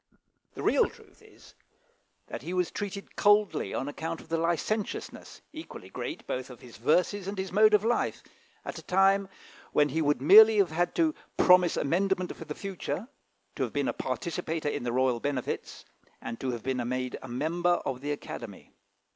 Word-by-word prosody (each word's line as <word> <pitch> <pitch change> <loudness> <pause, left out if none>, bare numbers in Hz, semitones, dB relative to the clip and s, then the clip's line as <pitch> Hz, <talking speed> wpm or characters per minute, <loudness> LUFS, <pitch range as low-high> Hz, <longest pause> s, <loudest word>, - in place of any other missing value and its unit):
The - - -6
real - - +3
truth - - -19
is, - - -18 0.7
that - - -7
he 170 +7 -5
was 180 -1 0
treated 200 -1 -6
coldly 205 - +3
on 135 - -2
account 160 +3 -4
of - - -15
the 165 - 0
licentiousness, 175 +6 -3
equally 315 +1 -9
great, 330 - -6
both 130 0 -4
of 125 -3 -12
his 120 -2 -13
verses 180 - +1
and 200 0 -4
his 190 -1 -3
mode 215 +2 +6
of 210 +1 +1
life, 240 +1 0 0.4
at - - -5
a - - -10
time 195 +1 +3 0.4
when 150 0 +4
he 160 +4 -1
would 145 -3 +2
merely 215 +9 +8
have 195 -5 +3
had 175 +2 0
to 320 -2 +2 0.2
promise 180 -1 +5
amendment 185 +4 0
for - - -9
the - - -6
future, 195 +3 -5 0.5
to - - -5
have 125 -4 -1
been 145 -1 0
a - - 0
participator 155 +4 -3
in - - -3
the 120 -1 -2
royal 125 -1 +1
benefits, 135 -1 -4 0.3
and 115 0 -6
to 130 - -2
have 120 -3 -4
been 130 -1 -1
made 130 0 -3
a - - -9
member 170 +8 +1
of 130 -1 -3
the 145 +1 -3
Academy. 145 - -7
165 Hz, 185 wpm, -28 LUFS, 130-195 Hz, 0.7 s, merely